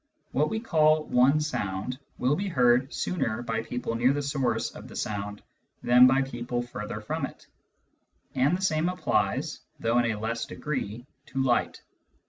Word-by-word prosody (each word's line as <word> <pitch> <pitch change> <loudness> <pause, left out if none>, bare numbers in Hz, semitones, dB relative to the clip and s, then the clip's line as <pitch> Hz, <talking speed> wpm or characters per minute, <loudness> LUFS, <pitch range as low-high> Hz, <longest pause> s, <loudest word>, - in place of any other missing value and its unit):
What 150 +3 +1
we 220 - -1
call 155 -7 +3
one 135 +2 +4
sound 125 -4 -3 0.2
will 130 +4 +2
be 200 +4 -2
heard 125 -5 +3
sooner 120 -10 -2
by 115 -1 -1
people 120 0 -4
near 120 +3 +3
the 145 0 -2
source 135 -4 0
of - - -11
the - - -12
sound 105 0 -4 0.4
than 125 +1 +7
by 135 +1 +3
people 120 -1 -3
further 105 -3 -6
from - - -3
it, - - -16 0.9
and 135 +6 +2
the 190 - -6
same 160 -1 +2
applies, 180 0 0 0.2
though 115 +2 +2
in 120 -1 +2
a 105 - -4
less 115 +2 -2
degree, 120 -6 -4 0.2
to 135 0 -1
light. 125 -2 0
125 Hz, 165 wpm, -27 LUFS, 115-150 Hz, 0.9 s, than